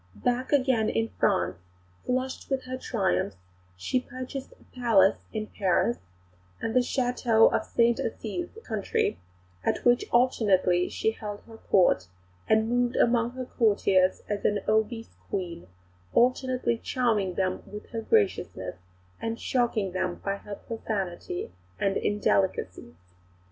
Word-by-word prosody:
Back 245 Hz, +1 st, 0 dB
again 260 Hz, -6 st, +3 dB
in 115 Hz, 0 st, 0 dB
France, 90 Hz, 0 st, +2 dB, 0.5 s
flushed 255 Hz, +1 st, -2 dB
with 270 Hz, -1 st, -1 dB
her 255 Hz, 0 st, -5 dB
triumphs, 195 Hz, -, -1 dB, 0.4 s
she 170 Hz, -, 0 dB
purchased 255 Hz, +1 st, -7 dB
a -, -, -20 dB
Palace 220 Hz, -6 st, +4 dB
in 215 Hz, -1 st, -3 dB
Paris, 185 Hz, -, +1 dB, 0.6 s
and 225 Hz, -, -2 dB
the 255 Hz, -, +5 dB
château 245 Hz, -3 st, +3 dB
of -, -, +1 dB
Sainte 235 Hz, 0 st, +2 dB
Assize 230 Hz, +10 st, -3 dB
in -, -, -19 dB
the 450 Hz, -, -11 dB
country, 215 Hz, -, -1 dB, 0.4 s
at -, -, -1 dB
which 245 Hz, 0 st, +4 dB
alternately 195 Hz, -8 st, +3 dB
she 220 Hz, -, 0 dB
held 210 Hz, -2 st, -7 dB
her 225 Hz, -1 st, -14 dB
Court, 175 Hz, -, +3 dB, 0.4 s
and 220 Hz, 0 st, +4 dB
moved 245 Hz, +1 st, +1 dB
among 235 Hz, 0 st, +2 dB
her 255 Hz, 0 st, -5 dB
courtiers 200 Hz, -6 st, +2 dB
an 205 Hz, 0 st, 0 dB
obese 220 Hz, +2 st, 0 dB, 0.2 s
Queen, 170 Hz, -, -4 dB, 0.5 s
alternately 250 Hz, -1 st, +2 dB
charming 215 Hz, -9 st, 0 dB
them 185 Hz, -1 st, 0 dB
with 210 Hz, +1 st, -9 dB
her 225 Hz, -2 st, -3 dB
graciousness 295 Hz, -, 0 dB, 0.4 s
and 225 Hz, 0 st, -3 dB
shocking 235 Hz, -6 st, 0 dB
them 185 Hz, -1 st, -1 dB
by 200 Hz, 0 st, 0 dB
her 205 Hz, 0 st, -8 dB
profanity 190 Hz, -, -4 dB, 0.3 s
and 195 Hz, -1 st, +1 dB
indelicacies. 190 Hz, -, 0 dB
220 Hz, 135 wpm, -27 LUFS, 190-245 Hz, 0.6 s, the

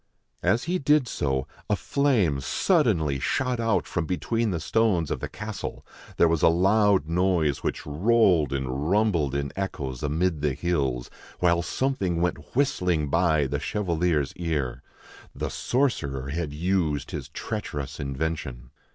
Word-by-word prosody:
As 120 Hz, -, +2 dB
he 180 Hz, +2 st, -1 dB
did 145 Hz, -3 st, +3 dB
so, 65 Hz, -, -1 dB, 0.2 s
a 105 Hz, -, +3 dB
flame 110 Hz, -, +1 dB
suddenly 70 Hz, +1 st, +2 dB
shot 125 Hz, -, 0 dB
out 115 Hz, -3 st, +1 dB
from 85 Hz, -3 st, -2 dB
between 115 Hz, +5 st, 0 dB
the 85 Hz, -4 st, -1 dB
stones 90 Hz, -2 st, +1 dB
of -, -, -1 dB
the -, -, -5 dB
castle, 105 Hz, -1 st, -6 dB, 0.3 s
there 85 Hz, -, +5 dB
was 80 Hz, -2 st, +1 dB
a -, -, +6 dB
loud 95 Hz, 0 st, +3 dB
noise 85 Hz, -4 st, +1 dB
which -, -, -3 dB
rolled 90 Hz, 0 st, +3 dB
and 70 Hz, +2 st, -2 dB
rumbled 90 Hz, -9 st, +2 dB
in 70 Hz, -1 st, -2 dB
echoes 70 Hz, -10 st, -4 dB
amid 80 Hz, +2 st, 0 dB
the 75 Hz, -3 st, 0 dB
hills, 70 Hz, -6 st, -1 dB, 0.3 s
while 85 Hz, -1 st, +3 dB
something 95 Hz, -5 st, -1 dB
went 85 Hz, -2 st, -2 dB
whistling 90 Hz, -, +1 dB
by 80 Hz, -4 st, +3 dB
the 70 Hz, +1 st, -2 dB
chevalier's 85 Hz, -6 st, 0 dB
ear. 75 Hz, -8 st, -2 dB, 0.5 s
The -, -, -3 dB
sorcerer 70 Hz, -, -1 dB
had 80 Hz, +1 st, -3 dB
used 80 Hz, -2 st, -1 dB
his 70 Hz, -6 st, -5 dB
treacherous 75 Hz, -6 st, -5 dB
invention. 70 Hz, -3 st, -4 dB
85 Hz, 145 wpm, -26 LUFS, 70-100 Hz, 0.5 s, a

